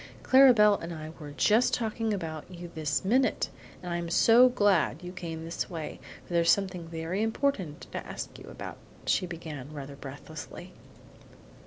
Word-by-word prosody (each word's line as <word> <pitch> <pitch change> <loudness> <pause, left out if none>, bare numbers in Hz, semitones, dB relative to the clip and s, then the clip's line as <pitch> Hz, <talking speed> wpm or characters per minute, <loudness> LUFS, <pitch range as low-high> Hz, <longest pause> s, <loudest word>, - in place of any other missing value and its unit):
"Clara 265 0 +8
Belle 210 -3 +5
and 165 - -5
I 155 -1 -6
were 150 -2 -8
just 215 +11 +3
talking 225 -1 -2
about 160 -6 -4
you 175 -1 -9
this 155 +1 -1
minute, 255 +6 +2 0.3
and 175 -1 -3
I'm 170 0 -3
so 235 +8 +6
glad 195 - +2
you 180 - -6
came 165 -3 -6
this 165 - -3
way, 160 -4 -6 0.3
for - - -8
there's 170 -1 +3
something 180 -3 +1
very 165 +4 -3
important 220 - -1
to - - -4
ask - - -7
you - - -12
about," - - -8 0.3
she 185 - +1
began, 155 -5 -7
rather 140 -2 -7
breathlessly. 140 0 -9
175 Hz, 165 wpm, -29 LUFS, 160-210 Hz, 0.3 s, Clara